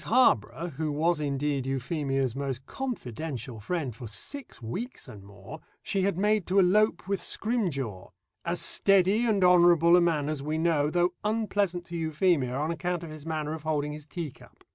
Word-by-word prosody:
Harborough, 165 - +3
who 155 -1 -1
was 160 +3 +1
indeed 140 -2 -1
Euphemia's 135 -1 -1
most 135 -2 -4
confidential 130 - -5
friend 140 - -3
for 120 0 -8
six 260 - -6
weeks 195 - -6
and 105 - -10
more, 100 +1 -11 0.2
she 195 - -1
had 195 -2 +1
made 210 -1 +2
to 190 - +1
elope 195 0 +3
with 200 -1 -1
Scrimgeour 140 - -2 0.3
as - - -1
steady 195 +4 +3
and 205 -4 +2
honourable 175 -1 +6
a 180 - +6
man 160 -4 +1
as 155 -2 -2
we 155 +2 -2
know, 160 -3 +2
though 175 +2 +1
unpleasant 205 -5 0
to 170 - -6
Euphemia 160 -5 +1
on 150 +4 -1
account 175 0 -2
of 165 - -7
his 155 0 -10
manner 155 -1 -2
of 160 - -6
holding 150 -1 -1
his 150 0 -10
teacup. 160 -5 -8
160 Hz, 170 wpm, -28 LUFS, 140-185 Hz, 0.3 s, honourable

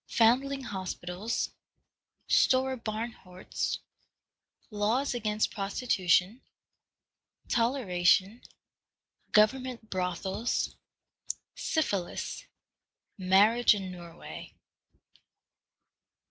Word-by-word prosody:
Foundling 265 +4 +3
Hospitals. 190 0 -3 0.8
Stora 260 0 +3
Barnhordst. 215 -5 -4 0.9
Laws 220 +7 +1
against 215 -3 0
Prostitution. 195 0 +1 1.1
Toleration. 215 -3 +2 0.9
Government 230 +1 +2
Brothels. 185 +4 -1 0.8
Syphilis. 200 - -2 0.7
Marriage 210 +5 +5
in 190 -2 -5
Norway. 175 -2 -10
215 Hz, 50 wpm, -29 LUFS, 185-240 Hz, 1.1 s, Marriage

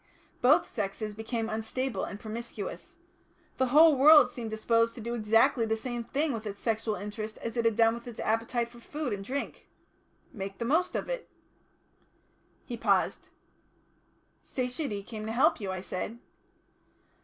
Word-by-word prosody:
Both 295 +8 +5
sexes 210 0 -4
became 225 +1 -3
unstable 225 0 -2
and 200 - -7
promiscuous. 225 -1 -7 0.6
The 260 - +2
whole 305 +4 +7
world 285 -1 +8
seemed 235 -3 -5
disposed 230 +1 +1
to - - -8
do 235 +2 -3
exactly 230 +3 +3
the 220 0 0
same 240 +1 -4
thing 285 +4 0
with 220 -1 -5
its 200 -1 -6
sexual 220 -1 -1
interest 215 +3 -6
as 230 - -5
it 235 -1 0
had 225 -2 +3
done 225 0 +4
with 235 +1 -8
its 235 - -8
appetite 230 +2 0
for 240 0 -15
food 290 0 -4
and 200 -1 -4
drink 270 +7 -5 0.6
make 195 -3 -6
the 235 - -3
most 320 +9 +1
of - - -2
it." - - -4 1.4
He - - -5
paused. - - +1 1.1
"Satiety 250 -4 -3
came 215 0 -7
to - - -2
help 245 -1 +3
you," 195 -2 -3
I 185 -1 -4
said. 195 +4 -5
230 Hz, 160 wpm, -29 LUFS, 215-250 Hz, 1.4 s, world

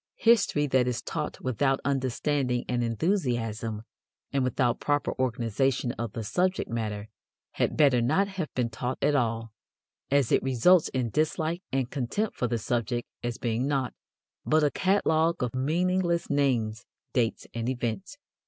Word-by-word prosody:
History 225 - +4
that 130 -3 +2
is 125 -2 -2
taught - - -4
without 135 +2 +1
understanding 130 -1 0
and 120 -1 0
enthusiasm 115 - -1 0.5
and 135 -1 +2
without 125 -1 +1
proper 145 0 0
organization 125 +1 0
of 115 -4 -5
the 115 - -4
subject 185 - 0
matter 105 -2 -3 0.4
had - - -1
better 140 -6 +5
not 155 +12 +2
have 190 -6 -4
been 120 -2 0
taught 125 +3 -3
at 150 - +3
all, 115 -4 0 0.6
as 140 -3 +2
it - - +4
results 135 +7 +4
in 125 -3 -2
dislike 155 - 0
and 130 -2 -1
contempt 145 - -2
for 125 - 0
the 120 0 0
subject 120 +2 -2
as 120 -1 -3
being 120 +2 -1
nought 135 -4 0 0.5
but 155 0 +3
a 145 - +3
catalogue 165 -5 +2
of 120 - -2
meaningless 170 +5 +1
names, 120 -6 +1 0.3
dates 120 -3 0
and 115 +1 -2
events. 130 - -3
130 Hz, 150 wpm, -28 LUFS, 120-155 Hz, 0.6 s, better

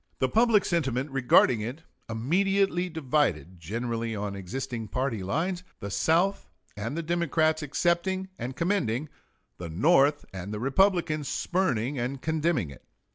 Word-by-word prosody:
The 130 - +2
public 225 - +4
sentiment 135 -5 0
regarding 125 -3 +4
it 125 +9 -5 0.3
immediately 180 - +1
divided, 125 - 0
generally 115 +5 -3
on 100 -1 -3
existing 115 +4 -5
party 125 0 -2
lines 175 - -1 0.2
the 100 - -6
South 165 - +1 0.3
and 115 +9 -4
the 170 - -2
Democrats 160 -1 +1
accepting 175 +5 0
and 125 +2 -4
commending, 155 - 0 0.5
the 85 -1 -6
North 145 - +3
and 95 +1 -6
the 105 - -4
Republicans 155 - +2
spurning 140 - 0
and 130 +3 -2
condemning 160 - 0
it. 70 - -14
135 Hz, 130 wpm, -27 LUFS, 115-170 Hz, 0.5 s, public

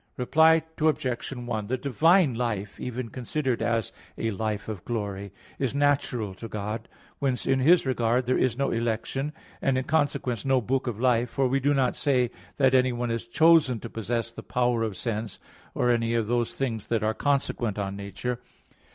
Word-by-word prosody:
Reply 160 +5 +4 0.2
Obj. 140 -6 0
1: 120 -5 -4
The 130 +3 -1
divine 155 - +3
life, 110 -4 -3
even 125 -1 -4
considered 130 +1 -2
as 115 -3 0 0.3
a 115 - -1
life 105 +1 -3
of 105 -5 -5
glory, 100 -4 -4 0.3
is 135 -1 -1
natural 140 -7 +1
to 105 +5 -8
God; 110 +1 -5 0.3
whence 135 -3 0
in 135 - +2
His 165 +6 +5
regard 125 -1 +1
there 130 - +2
is 125 -2 +1
no 140 0 0
election, 115 +5 -1 0.3
and 135 -1 +2
in 130 - 0
consequence 140 -6 0
no 135 -1 +3
book 130 +3 -1
of 115 -3 -3
life: 120 -1 +2
for 135 +1 +1
we 135 +2 +1
do 145 +2 +2
not 130 -2 +2
say 125 -4 +1 0.3
that 135 -2 +4
anyone 125 -2 +2
is 115 0 -3
chosen 155 -2 +4
to 115 - -7
possess 115 +1 -2
the - - -9
power 120 -2 0
of 110 -4 -2
sense, 110 +1 -3 0.4
or 125 - +2
any 115 -1 +1
of 115 -2 +1
those 120 +1 0
things 115 -6 -3
that 115 -2 0
are 110 +1 +1
consequent 125 -5 0
on 100 -1 -3
nature. 100 +5 -4
120 Hz, 180 wpm, -27 LUFS, 115-135 Hz, 0.4 s, His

